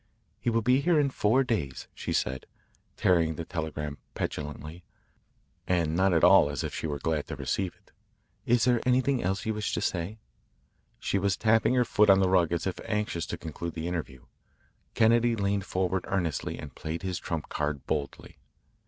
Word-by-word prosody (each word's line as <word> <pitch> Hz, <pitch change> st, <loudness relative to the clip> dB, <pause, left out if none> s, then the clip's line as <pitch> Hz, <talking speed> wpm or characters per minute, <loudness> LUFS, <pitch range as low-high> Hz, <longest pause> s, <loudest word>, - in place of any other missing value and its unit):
"He -, -, 0 dB
will 115 Hz, -1 st, +1 dB
be 125 Hz, +4 st, +4 dB
here 165 Hz, +1 st, +3 dB
in 140 Hz, -2 st, +2 dB
four 125 Hz, +3 st, +3 dB
days," 100 Hz, -, -3 dB
she -, -, -5 dB
said, 65 Hz, +1 st, -1 dB, 0.5 s
tearing 85 Hz, -3 st, +3 dB
the 85 Hz, -, -5 dB
telegram 75 Hz, -3 st, -4 dB, 0.2 s
petulantly, 75 Hz, +3 st, -5 dB, 0.8 s
and 85 Hz, -3 st, +1 dB
not 95 Hz, +2 st, +3 dB
at 85 Hz, -2 st, +2 dB
all -, -, +7 dB
as -, -, -3 dB
if -, -, -4 dB
she -, -, -3 dB
were 75 Hz, -1 st, -2 dB
glad 75 Hz, +1 st, -1 dB
to -, -, -5 dB
receive 95 Hz, -3 st, -2 dB
it. -, -, -29 dB, 0.6 s
"Is 120 Hz, -1 st, +4 dB
there 125 Hz, -2 st, +3 dB
anything 130 Hz, +1 st, +2 dB
else 95 Hz, +2 st, 0 dB
that -, -, -10 dB
you -, -, +1 dB
wish 105 Hz, 0 st, -2 dB
to -, -, 0 dB
say?" 90 Hz, +5 st, -2 dB, 0.8 s
She 100 Hz, -, -1 dB
was 100 Hz, 0 st, +1 dB
tapping 110 Hz, +2 st, +3 dB
her 125 Hz, -1 st, +3 dB
foot 105 Hz, -2 st, +3 dB
on 95 Hz, 0 st, +7 dB
the 95 Hz, -1 st, +3 dB
rug 90 Hz, -3 st, +3 dB
as 85 Hz, -, -1 dB
if 95 Hz, -, -3 dB
anxious 105 Hz, -6 st, -2 dB
to -, -, -4 dB
conclude 80 Hz, +2 st, -6 dB
the 80 Hz, 0 st, -3 dB
interview. 75 Hz, -7 st, -5 dB, 0.7 s
Kennedy 115 Hz, +1 st, +4 dB
leaned 100 Hz, -2 st, 0 dB
forward 95 Hz, 0 st, -1 dB
earnestly 85 Hz, -8 st, -2 dB
and -, -, -8 dB
played 80 Hz, +4 st, -5 dB
his 90 Hz, -2 st, -2 dB
trump 80 Hz, -3 st, -4 dB
card 75 Hz, -2 st, -2 dB
boldly. 75 Hz, -2 st, -4 dB
95 Hz, 190 wpm, -28 LUFS, 80-110 Hz, 0.8 s, all